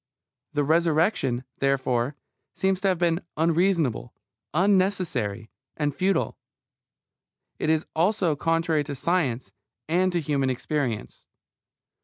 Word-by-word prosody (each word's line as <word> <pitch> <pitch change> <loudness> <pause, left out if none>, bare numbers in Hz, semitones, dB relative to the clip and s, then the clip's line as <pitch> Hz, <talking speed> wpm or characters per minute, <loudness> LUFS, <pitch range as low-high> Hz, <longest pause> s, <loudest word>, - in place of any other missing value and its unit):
The 145 -1 +1
Resurrection, 155 - +2 0.2
therefore, 135 -1 +1 0.4
seems 190 -1 0
to 195 - +1
have 185 -2 +2
been 170 0 +1 0.2
unreasonable, 165 - +1 0.4
unnecessary, 175 - +1 0.3
and 145 -2 -1
futile. 185 -2 0 1.2
It 155 - 0
is 160 -1 +2
also 175 -1 +2
contrary 165 0 +1
to 145 -1 -5
science 135 - 0 0.4
and 180 +3 +2
to 175 - 0
human 140 -4 0
experience. 130 -3 -3
160 Hz, 105 wpm, -25 LUFS, 135-180 Hz, 1.2 s, Resurrection